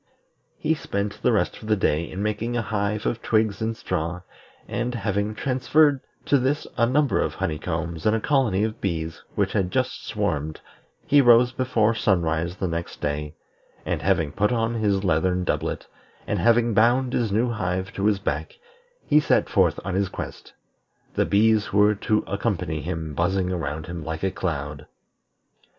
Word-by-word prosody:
He 160 Hz, +1 st, +1 dB
spent 100 Hz, -9 st, -3 dB
the -, -, +3 dB
rest -, -, 0 dB
of 110 Hz, -, -9 dB
the 110 Hz, -, +4 dB
day 85 Hz, -4 st, 0 dB
in 95 Hz, +2 st, -4 dB
making 110 Hz, +3 st, -1 dB
a 115 Hz, -, 0 dB
hive 105 Hz, 0 st, -2 dB
of 115 Hz, -, -1 dB
twigs 110 Hz, -2 st, +1 dB
and 110 Hz, 0 st, -2 dB
straw, 90 Hz, -2 st, -3 dB, 0.5 s
and, 120 Hz, +1 st, -2 dB
having 105 Hz, -1 st, -1 dB
transferred 135 Hz, +4 st, +2 dB, 0.2 s
to 140 Hz, -, +3 dB
this 135 Hz, +4 st, 0 dB
a 115 Hz, -, +3 dB
number 140 Hz, +2 st, +2 dB
of -, -, -2 dB
honey 75 Hz, -2 st, -2 dB
combs 85 Hz, 0 st, -3 dB
and 110 Hz, -, +4 dB
a -, -, +1 dB
colony 115 Hz, -7 st, +2 dB
of 110 Hz, 0 st, -3 dB
bees 80 Hz, -4 st, -3 dB
which -, -, 0 dB
had 95 Hz, -3 st, +1 dB
just 130 Hz, +4 st, -1 dB
swarmed, 80 Hz, -8 st, -2 dB, 0.5 s
he 145 Hz, +1 st, +5 dB
rose 120 Hz, -1 st, +6 dB
before 120 Hz, -4 st, +1 dB
sunrise 85 Hz, -5 st, 0 dB
the 95 Hz, -, -2 dB
next 85 Hz, 0 st, -4 dB
day, 75 Hz, +1 st, -3 dB, 0.5 s
and -, -, -1 dB
having 75 Hz, -3 st, +1 dB
put 105 Hz, +7 st, +1 dB
on 115 Hz, -1 st, 0 dB
his 105 Hz, -4 st, +1 dB
leathern 90 Hz, +1 st, +1 dB
doublet, -, -, -2 dB, 0.4 s
and -, -, -1 dB
having 115 Hz, 0 st, +3 dB
bound 120 Hz, +4 st, +3 dB
his 115 Hz, -4 st, 0 dB
new 115 Hz, +4 st, +1 dB
hive 95 Hz, -3 st, -2 dB
to 100 Hz, +1 st, 0 dB
his 105 Hz, -2 st, +3 dB
back, 470 Hz, -, -3 dB, 0.5 s
he 150 Hz, -, +5 dB
set 150 Hz, -, +2 dB
forth -, -, +2 dB
on 95 Hz, -, -2 dB
his 95 Hz, 0 st, 0 dB
quest; -, -, -8 dB, 0.6 s
the -, -, +1 dB
bees 110 Hz, +1 st, +3 dB
who 100 Hz, -, -2 dB
were 105 Hz, +1 st, +5 dB
to 105 Hz, +1 st, 0 dB
accompany 95 Hz, -7 st, -2 dB
him 80 Hz, -1 st, -4 dB
buzzing 90 Hz, +4 st, 0 dB
around 80 Hz, -3 st, -3 dB
him 85 Hz, -2 st, -6 dB
like 80 Hz, +2 st, -5 dB
a 95 Hz, -, +1 dB
cloud. 75 Hz, -4 st, -4 dB
100 Hz, 175 wpm, -24 LUFS, 85-115 Hz, 0.6 s, rose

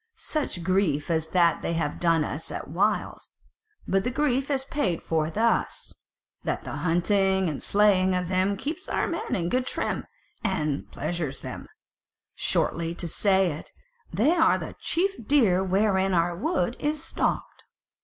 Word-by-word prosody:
Such 280 Hz, -, -3 dB
grief 170 Hz, -5 st, +1 dB
as 160 Hz, -1 st, 0 dB
that 170 Hz, -1 st, +3 dB
they -, -, -2 dB
have 165 Hz, -3 st, -2 dB
done 165 Hz, -2 st, +3 dB
us 155 Hz, +3 st, -4 dB
at -, -, -5 dB
whiles: 205 Hz, +4 st, -1 dB, 0.6 s
but 195 Hz, 0 st, +2 dB
the 250 Hz, -, 0 dB
grief 270 Hz, 0 st, 0 dB
is 270 Hz, -2 st, 0 dB
paid 210 Hz, -, -1 dB
for 160 Hz, -1 st, 0 dB
thus, 225 Hz, +7 st, 0 dB, 0.5 s
that -, -, -2 dB
the -, -, -5 dB
hunting 190 Hz, +2 st, +2 dB
and 150 Hz, -4 st, -3 dB
slaying 190 Hz, -3 st, +3 dB
of 180 Hz, -1 st, -1 dB
them 190 Hz, +2 st, +1 dB
keeps 320 Hz, -, -4 dB
our -, -, +1 dB
men 335 Hz, -, -2 dB
in 170 Hz, -3 st, -1 dB
good 255 Hz, +6 st, 0 dB
trim, -, -, -2 dB, 0.4 s
and 155 Hz, -7 st, -1 dB
pleasures 160 Hz, -6 st, -3 dB
them; -, -, -7 dB, 0.7 s
shortly 170 Hz, 0 st, 0 dB
to 175 Hz, -, -3 dB
say 190 Hz, +1 st, +2 dB
it, 150 Hz, -, -8 dB, 0.4 s
they 250 Hz, +10 st, +3 dB
are 325 Hz, -2 st, +4 dB
the -, -, -7 dB
chief 365 Hz, -, -1 dB
deer 210 Hz, -11 st, +4 dB
wherewith 190 Hz, 0 st, +2 dB
our 170 Hz, 0 st, +2 dB
wood 240 Hz, -, -1 dB
is 300 Hz, +1 st, -1 dB
stocked." -, -, -2 dB
190 Hz, 155 wpm, -26 LUFS, 170-235 Hz, 0.7 s, are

